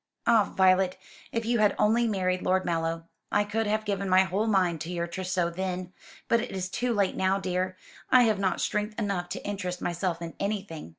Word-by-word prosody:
"Ah, 220 -3 +4
Violet, 185 -1 +4 0.3
if 230 -1 -2
you 235 0 +1
had 210 -1 +3
only 230 +3 +3
married 185 -3 0
Lord 185 0 +1
Mallow! 165 -1 -2 0.2
I 205 - +3
could 215 +1 -1
have 215 +1 0
given 200 -1 -2
my 185 +1 +6
whole 195 +4 -1
mind 180 -6 +2
to 165 +2 -5
your 170 -1 -1
trousseau 180 0 -2
then; 185 0 -4 0.3
but 235 -1 +3
it 245 - -5
is 185 -1 -4
too 245 +5 -1
late 200 -4 +1
now, 190 +1 +2
dear. 185 0 -2 0.3
I 255 -1 +7
have 215 -4 +2
not 190 -2 0
strength 210 +1 -1
enough 200 -5 -2
to - - -5
interest 185 -3 -3
myself 170 0 -2
in 170 -1 -6
anything." 200 - -3
190 Hz, 200 wpm, -28 LUFS, 180-210 Hz, 0.3 s, I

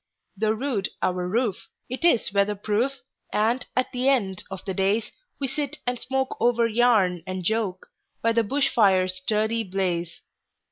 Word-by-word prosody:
Though 215 +2 +1
rude 225 -4 -1
our 180 -1 0
roof, 220 0 -1 0.2
it 255 +6 -6
is 240 - +3
weather 200 +1 +2
proof, 230 +7 -1 0.3
And 230 +4 +1
at 255 - +1
the 255 +2 +1
end 200 -9 +1
of 190 -1 -7
the 190 - -2
daysWe 220 - -2
sit 290 +2 -3
and 245 -1 -1
smoke 265 0 -1
over 235 -1 +3
yarn 220 -6 +3
and 185 0 -4
joke, 205 -2 -1 0.4
By 230 - +4
the 230 - +4
bush 275 +6 +1
fire's 190 -5 +3
sturdy 220 +4 0
blaze. 180 -4 -2
220 Hz, 155 wpm, -25 LUFS, 190-250 Hz, 0.4 s, By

